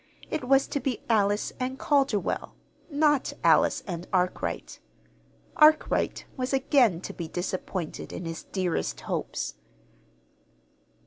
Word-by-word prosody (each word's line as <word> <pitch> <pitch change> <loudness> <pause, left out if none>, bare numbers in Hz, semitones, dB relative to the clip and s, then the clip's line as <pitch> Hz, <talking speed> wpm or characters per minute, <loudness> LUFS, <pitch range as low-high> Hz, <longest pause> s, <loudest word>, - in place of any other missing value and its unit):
It 310 -5 -2
was 270 +1 +4
to 285 - -1
be 260 -3 -3
Alice 205 -1 +2
and 255 +1 -2
Calderwell, 275 -8 0 0.3
not 295 -2 +2
Alice - - +4
and 175 -3 -5
Arkwright. 180 -1 -1 0.8
Arkwright 310 0 +4
was 255 0 -2
again 260 - +3
to - - -6
be 170 - -5
disappointed 180 -1 -4
in 175 - -6
his 165 0 -6
dearest 185 -4 -2
hopes. - - -3
240 Hz, 115 wpm, -27 LUFS, 180-275 Hz, 0.8 s, was